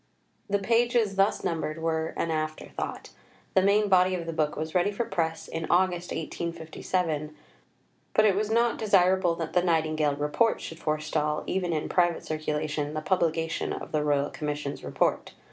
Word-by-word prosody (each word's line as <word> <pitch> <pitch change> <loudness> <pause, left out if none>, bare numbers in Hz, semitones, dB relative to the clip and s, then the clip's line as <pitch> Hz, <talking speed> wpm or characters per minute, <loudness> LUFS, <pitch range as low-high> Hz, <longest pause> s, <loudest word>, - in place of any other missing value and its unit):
The 200 - +3
pages 230 0 +2
thus 195 +2 +2
numbered 160 -1 -2
were 160 0 -1
an 165 - -1
after 155 0 -3
thought. - - -5 0.4
The 190 - +5
main 205 +2 +3
body 185 -1 +4
of 170 -2 -4
the 165 - -4
book 155 -2 0
was 155 +1 -4
ready 180 +2 +2
for 220 +3 -2
press 165 -5 -2
in 165 0 -4
August 180 -1 +2
1857, 160 -1 -3 0.8
but 215 - +5
it 205 - +5
was 210 +1 0
not 235 +1 +2
desirable 190 -4 +3
that 165 -1 -5
the 180 - +4
Nightingale 155 -4 +1
Report 150 +11 +1
should 165 - -8
forestall, 155 -1 -1
even 180 -2 -1
in 155 -2 -1
private 175 -2 +1
circulation, 150 -1 -2
the 155 - -2
publication 165 -3 0
of - - -7
the 155 -1 +1
Royal 145 -1 +1
Commission's 150 -1 -4
Report. - - -1
165 Hz, 165 wpm, -27 LUFS, 155-190 Hz, 0.8 s, The